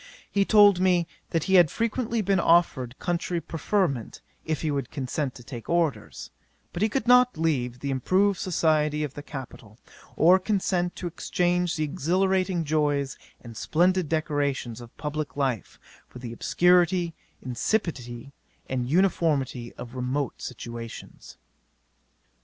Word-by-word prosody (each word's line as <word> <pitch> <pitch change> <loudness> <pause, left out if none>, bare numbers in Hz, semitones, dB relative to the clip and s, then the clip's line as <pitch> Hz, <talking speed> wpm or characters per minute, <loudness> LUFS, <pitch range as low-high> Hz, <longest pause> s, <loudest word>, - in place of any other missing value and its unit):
He 200 -1 +2
told 205 -3 +6
me, 180 -2 +3 0.2
that 165 -2 0
he 190 - -1
had 175 -4 +7
frequently 230 - -1
been 195 0 +2
offered 165 -8 +2
country 175 0 -2
preferment, 165 - -2 0.3
if 160 -1 -2
he 155 - 0
would 140 -3 -2
consent 135 0 -3
to 120 - -12
take 120 -1 -9
orders; 140 - -1 0.4
but 175 - -4
he 215 - +3
could 250 +1 -2
not 250 -2 +5
leave 125 -7 -1
the 140 - -2
improved 185 +9 +2
society 155 -4 +1
of 145 -3 -4
the 145 - -7
capital, 125 -7 -10 0.4
or 180 +4 +6
consent 185 -3 0
to - - -7
exchange 175 0 0
the 155 - -1
exhilarating 185 +4 0
joys 145 -3 0 0.3
and 115 -2 -11
splendid 180 +6 +1
decorations 145 -7 -1
of 120 -1 -14
publick 150 -1 -4
life, 130 - -2 0.3
for - - -13
the 120 -2 -7
obscurity, 175 +4 +3 0.3
insipidity, 125 - -2 0.3
and 125 -1 -2
uniformity 150 -8 +1
of 120 0 -9
remote 130 +2 -3
situations. 115 -1 -8
155 Hz, 135 wpm, -26 LUFS, 130-180 Hz, 0.4 s, had